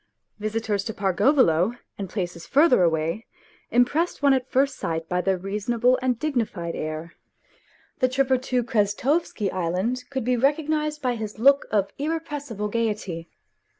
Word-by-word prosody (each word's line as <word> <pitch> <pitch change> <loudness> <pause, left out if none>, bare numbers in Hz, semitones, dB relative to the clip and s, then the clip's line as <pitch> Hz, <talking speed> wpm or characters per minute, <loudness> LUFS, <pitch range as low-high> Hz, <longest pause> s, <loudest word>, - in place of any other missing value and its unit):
Visitors 215 -1 -1
to 220 - -4
Pargolovo 195 - +3 0.2
and 195 -2 -6
places 175 -4 -4
further 285 - +5
away 165 +5 0 0.4
impressed 290 +8 +1
one 280 -1 +6
at 260 -1 -1
first 270 +1 +1
sight 165 0 -3
by 180 +1 0
their 190 0 +1
reasonable 225 +6 +1
and 255 -2 +1
dignified 225 - -2
air; 155 +2 -5 0.9
the 255 - +3
tripper 260 0 +2
to 250 -1 -1
Krestovsky 225 - 0
Island 185 +8 -1
could 265 -3 -3
be 250 +2 +1
recognized 300 +3 0
by 250 -1 +1
his 220 -2 -6
look 275 +5 +4
of 200 -2 0
irrepressible 290 -8 -3
gaiety. 210 -7 -2
230 Hz, 140 wpm, -24 LUFS, 190-265 Hz, 0.9 s, one